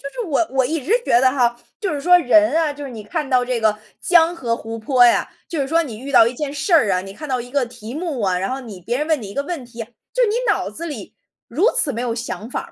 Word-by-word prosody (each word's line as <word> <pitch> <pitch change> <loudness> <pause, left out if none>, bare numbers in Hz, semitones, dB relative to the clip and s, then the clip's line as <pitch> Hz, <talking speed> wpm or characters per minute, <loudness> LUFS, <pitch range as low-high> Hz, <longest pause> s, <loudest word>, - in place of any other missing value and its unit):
是 - - -7
我 320 +3 +1
我 265 -1 +2
一 315 +1 -2
直 360 - -1
觉 235 - +4
得 260 0 +4
哈， 240 -3 +1 0.2
就 390 -4 -1
是 290 - -3
说 360 +4 +6
人 225 -6 +4
啊 320 -2 +2
就 290 0 -8
是 275 - -7
你 225 -3 -8
看 295 +7 -3
到 255 -2 +3
这 245 -2 -2
个 215 -1 +2 0.2
江 340 -1 +4
河 235 -8 -2
湖 225 0 -7
泊 245 +2 +4
呀 240 - +3 0.2
就 320 -4 -3
是 270 - 0
说 330 +3 +3
你 235 -9 -7
遇 270 +4 -7
到 225 - +7
一 235 - -2
件 285 +2 -4
事 295 +6 -3
儿 275 -11 +4
啊， 180 - +1
你 195 +1 -9
看 300 +7 -8
到 255 -2 -1
一 245 +1 -9
个 280 -1 +1
题 235 +1 -10
目 315 -5 -3
啊， 185 -2 +1
然 195 - -2
后 265 +1 -3
你 210 -7 -10
别 240 +7 -2
人 300 - -1
问 315 -3 +1
你 210 - -7
一 - - -10
个 280 - -1
问 295 -3 -5
题 235 -1 -11
啊， - - -8 0.3
就 - - +1
是 475 - +3
你 420 - 0 0.2
脑 - - 0
子 335 - -7
里 300 - -8 0.3
如 360 - +2
此 285 - 0
没 235 - -4
有 235 -2 -2
想 230 -1 -5
法 - - -3
260 Hz, 320 characters per minute, -20 LUFS, 230-310 Hz, 0.3 s, 到